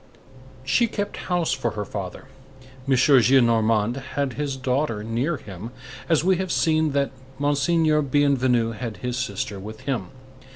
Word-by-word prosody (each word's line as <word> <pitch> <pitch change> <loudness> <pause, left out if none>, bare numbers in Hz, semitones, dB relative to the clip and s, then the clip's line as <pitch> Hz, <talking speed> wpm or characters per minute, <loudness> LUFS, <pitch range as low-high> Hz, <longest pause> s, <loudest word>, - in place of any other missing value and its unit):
She 135 - +2
kept 205 -2 -4
house 175 -2 +1
for 130 -4 -1
her 105 - -2
father. 95 0 -6 0.6
M. 135 - +4
Gillenormand 120 -4 +4 0.2
had 140 -3 0
his 145 -2 -3
daughter 130 -4 -1
near 120 +9 -1
him, 100 0 -9 0.4
as 160 -2 +3
we 185 0 +3
have 190 -1 -2
seen 155 -2 +2
that 140 -1 +1 0.3
Monseigneur 150 +2 +2
Bienvenu 130 -4 +2
had 115 -1 -6
his 125 -1 -1
sister 100 -5 -3
with 110 +4 -9
him. 130 -8 -2
130 Hz, 140 wpm, -24 LUFS, 115-150 Hz, 0.6 s, M